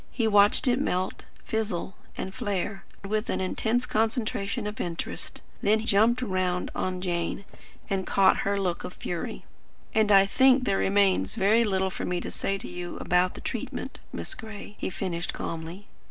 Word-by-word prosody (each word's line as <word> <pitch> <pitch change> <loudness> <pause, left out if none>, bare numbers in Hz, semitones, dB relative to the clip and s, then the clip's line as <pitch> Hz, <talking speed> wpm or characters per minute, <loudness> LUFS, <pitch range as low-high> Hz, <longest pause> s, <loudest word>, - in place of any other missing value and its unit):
He 230 -3 0
watched 205 +5 +5
it 250 +2 +3
melt, 185 -7 -1 0.2
fizzle, 210 -4 -2 0.2
and 190 - -4
flare, 200 -4 -2 0.2
with 215 +2 -1
an - - 0
intense 225 +6 0
concentration 220 -1 -1
of 210 +1 -4
interest; 170 -1 -4 0.2
then 215 +2 +2
jumped 230 +5 +4
round 185 -4 -1
on 185 -1 -2
Jane, 175 +1 -2 0.4
and 190 -1 -1
caught 195 -1 +5
her 200 0 0
look 180 -3 -1
of 180 - -6
fury. 175 -2 -5 0.5
"And 215 -1 +3
I 195 -1 +8
think 260 +5 +5
there 195 - +1
remains 195 - +2
very 215 +4 +4
little 190 -3 +1
for - - -5
me 180 0 -1
to - - -5
say 195 - -1
to - - -7
you 175 0 -6
about 180 +1 +2
the - - -8
treatment, - - -4
Miss - - -4
Gray," 215 -2 -9
he - - -2
finished 180 -2 -3
calmly. 165 +4 -5
195 Hz, 170 wpm, -27 LUFS, 185-220 Hz, 0.5 s, I